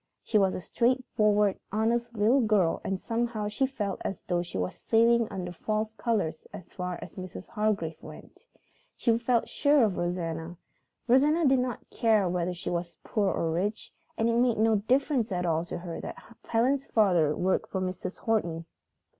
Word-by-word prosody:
She 215 - +2
was 190 -2 +2
a - - -3
straightforward, 210 -2 +1
honest 235 +2 0
little 230 +6 +4
girl, 210 -7 +2
and 195 -1 -2
somehow 230 -1 -2
she 235 +6 0
felt 205 -7 -4
as 195 - -4
though 175 -1 0
she 175 - -6
was 90 0 -2
sailing 230 0 +3
under 180 -2 -5
false 215 +4 -2
colors 205 -9 -2
as 175 - -11
far 180 -1 -4
as - - -12
Mrs. 185 -1 -8
Hargrave 210 -7 -1
went. 475 - -13 0.5
She 230 -2 +2
felt 235 0 +1
sure 290 -2 +3
of 205 -5 +1
Rosanna; 170 -1 -3 0.5
Rosanna 295 +7 +4
did 265 -1 +4
not 250 -2 -3
care 220 -4 +3
whether 175 0 -1
she 175 - -5
was 170 0 -3
poor 205 -3 0
or 165 - -1
rich, 200 +6 -2 0.2
and 225 - +1
it 230 0 +2
made 245 -2 +3
no 220 0 +3
difference 250 +1 +1
at 180 -1 -1
all 165 -1 +1
to - - -5
her 175 -1 -6
that - - -6 0.3
Helen's 260 +4 +1
father 175 -9 +3
worked 185 +1 0
for 190 - -2
Mrs. 185 0 -4
Horton. 170 -7 -1
210 Hz, 175 wpm, -28 LUFS, 180-235 Hz, 0.5 s, little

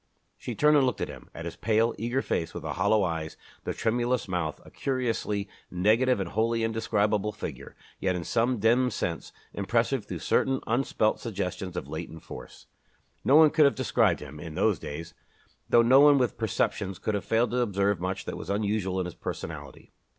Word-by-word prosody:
She 120 - -6
turned 150 +6 +4
and 145 - +5
looked 125 - 0
at - - -2
him - - -11
at - - -8
his - - -5
pale, 115 +2 +2
eager 120 +4 -1
face 80 - -2
with - - -5
the - - -3
hollow 100 +3 +2
eyes, 80 -3 -3 0.3
the - - -1
tremulous 120 +2 0
mouth 90 -5 -2
a - - -14
curiously 115 -6 -2 0.2
negative 110 +7 +3
and 95 -3 -2
wholly 115 +1 +1
indescribable 105 -2 0
figure, - - -7 0.2
yet 95 -1 0
in 90 - -3
some 120 +8 +1
dim 120 +4 +3
sense 85 -8 -3 0.2
impressive 115 +3 0
through 90 - -5
certain 130 - +1
unspelt 115 -2 +1
suggestions 95 -4 -4
of - - -4
latent 80 +1 -7
force. - - -10 0.6
No 135 - +4
one 155 -1 +8
could 155 -2 +5
have 140 - +3
described 115 -8 +2
him, 75 0 -9
in 80 -1 -8
those 100 -1 +2
days, 80 +3 -7 0.6
though 120 - +6
no 130 +3 +6
one 145 0 +7
with 125 -3 +1
perceptions 100 -3 -1
could 110 - -2
have 100 - -1
failed 115 +2 +1
to 125 - 0
observe 100 -4 +1
much 95 +1 -3
that - - -5
was - - -8
unusual 100 -2 0
in 90 - -1
his 90 - -6
personality. - - -7
110 Hz, 190 wpm, -28 LUFS, 95-120 Hz, 0.6 s, one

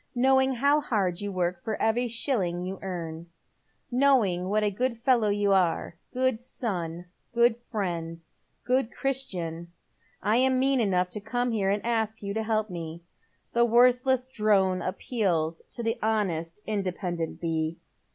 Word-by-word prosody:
Knowing 265 +1 +4
how 285 +4 +3
hard 195 -8 -1
you 205 0 -3
work 180 -1 -1
for 220 - -3
every 230 +3 +2
ehilling 205 -8 -1
you 190 +1 -5
earn 170 -3 -5 0.3
— - - -45 0.3
knowing 240 -9 +3
what 210 +1 +2
a 205 - +2
good 240 +4 -1
fellow 230 -2 +3
you 205 -1 +2
are 175 -2 +1
— - - -46
good 255 -2 +1
son, 180 -9 -4 0.3
good 235 0 +4 0.2
fiiend, 165 -6 -3 0.4
good 250 -1 +1
Christian 175 -11 -2 0.3
— - - -33
I 215 +3 +3
am 260 +1 +3
mean 270 0 +2
enough 185 -5 +1
to 210 - -5
come 245 +3 -1
here 200 -4 +1
and 205 +2 0
ask 220 -2 -1
you 200 0 -3
to 220 - -1
help 215 -1 0
me. 165 -1 -6 0.5
The 235 - +4
worthless 250 +2 +4
drone 200 -6 +2
appeals 180 -5 -1
to 235 - -6
the 225 +1 -1
honest, 200 -4 -1
independent 180 -5 -3
bee." 160 -1 -2
210 Hz, 160 wpm, -27 LUFS, 180-240 Hz, 0.5 s, Knowing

